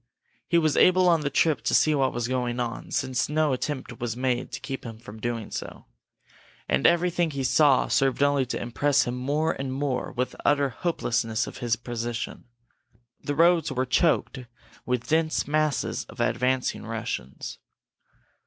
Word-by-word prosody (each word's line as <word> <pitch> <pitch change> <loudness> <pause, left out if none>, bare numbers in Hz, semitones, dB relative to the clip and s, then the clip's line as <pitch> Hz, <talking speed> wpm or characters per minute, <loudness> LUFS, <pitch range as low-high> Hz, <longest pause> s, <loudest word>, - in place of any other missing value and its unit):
He 170 - +3
was 155 -3 +2
able 185 0 +5
on 165 -3 +4
the 145 - -1
trip 155 +1 +2
to - - +1
see 155 - +4
what 135 -3 +2
was 120 -1 -2
going 125 -1 -1
on, 120 -1 -4
since 130 -2 -1
no 155 -1 +2
attempt 130 -2 -4
was 120 -1 -3
made 125 -1 -1
to - - -5
keep 135 -1 -6
him 115 -2 -8
from 110 -1 -11
doing 115 -1 -3
so. - - -7 0.8
And 65 - +3
everything 175 0 +2
he 140 -3 -3
saw 135 +1 +4
served 135 0 +2
only 140 -2 +2
to - - -3
impress 140 +4 +1
him 120 - -3
more 145 +5 0
and 135 -1 -4
more 135 -1 -2
with 125 0 -2
the - - -15
utter 145 -1 +3
hopelessness 115 -6 -1
of - - -9
his 120 -3 +1
position. 120 0 -5 0.8
The 145 - -2
roads 170 0 +4
were 130 0 0
choked 135 +1 +1 0.5
with 125 -1 -1
dense 160 0 +1
masses 155 -1 0
of - - -14
advancing 125 +2 0
Russians. 115 - -5
130 Hz, 170 wpm, -26 LUFS, 120-150 Hz, 0.8 s, able